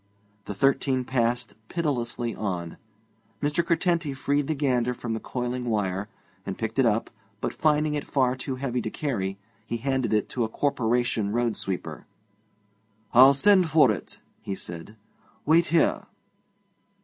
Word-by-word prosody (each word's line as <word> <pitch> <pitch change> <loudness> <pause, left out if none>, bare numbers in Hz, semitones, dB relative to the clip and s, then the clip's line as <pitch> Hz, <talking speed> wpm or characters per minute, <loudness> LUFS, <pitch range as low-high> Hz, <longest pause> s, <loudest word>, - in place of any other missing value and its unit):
The 105 - -5
thirteen 135 +1 +2
passed 120 -1 0 0.2
pitilessly 120 -7 -1
on. 90 -5 -4 0.6
Mr. 145 +3 +1
Curtenty 170 -3 0
freed 140 +1 0
the 155 - 0
gander 125 -4 +1
from 120 -2 -4
the 110 - -2
coiling 125 +1 -3
wire, 105 -3 -1 0.3
and 95 -1 -5
picked 110 +4 -3
it 130 - +5
up, 110 +1 0 0.3
but, - - -2
finding 150 -1 +2
it 145 -1 -2
far 130 -2 +1
too 130 +1 -4
heavy 125 -2 -2
to 110 - -3
carry, 100 -10 -2 0.3
he 115 +1 -3
handed 130 -1 -1
it 105 -1 +2
to 120 - -1
a 110 - -1
Corporation 120 -5 0
road 120 0 0
sweeper. 95 -2 -5 1.1
'I'll 130 +3 +8
send 185 +2 +4
for 150 -6 +5
it,' 100 - -6 0.2
he 100 - -4
said; 85 +4 -9 0.5
'wait 165 +3 +4
here.' 165 -1 +2
125 Hz, 150 wpm, -26 LUFS, 110-145 Hz, 1.1 s, I'll